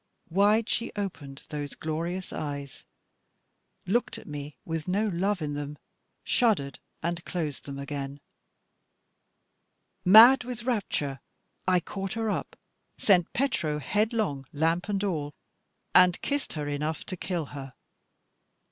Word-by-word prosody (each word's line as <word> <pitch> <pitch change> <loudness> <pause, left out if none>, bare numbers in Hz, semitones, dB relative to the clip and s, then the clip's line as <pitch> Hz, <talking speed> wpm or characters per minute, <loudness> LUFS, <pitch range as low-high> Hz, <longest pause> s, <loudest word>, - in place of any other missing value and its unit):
Wide 210 +5 +4
she 235 - -1
opened 150 -9 -5
those 145 -1 -4
glorious 170 +4 -3
eyes, 145 -2 -5 1.0
looked 230 +7 0
at - - -11
me 145 0 -7
with 160 -1 -3
no 205 +4 +1
love 190 0 0
in 145 -1 -2
them, 145 0 -5 0.5
shuddered, 190 - +2 0.2
and 170 0 -2
closed 160 -6 -4
them 140 -1 -6
again. 140 0 -5 1.8
Mad 230 +8 +9
with 245 -2 -6
rapture, 185 - -1 0.5
I 180 -1 +4
caught 195 +1 -4
her 225 -1 0
up, - - -3 0.4
sent 180 -5 +4
Petro 190 - 0
headlong 205 - 0
lamp 165 +6 +1
and 200 -1 0
all, 150 -7 -2 0.6
and 180 -1 +6
kissed 285 0 -1
her 150 -2 -3
enough 150 +2 -2
to 185 - -4
kill 175 -2 -2
her. 135 -2 -8
170 Hz, 125 wpm, -28 LUFS, 145-205 Hz, 1.8 s, Mad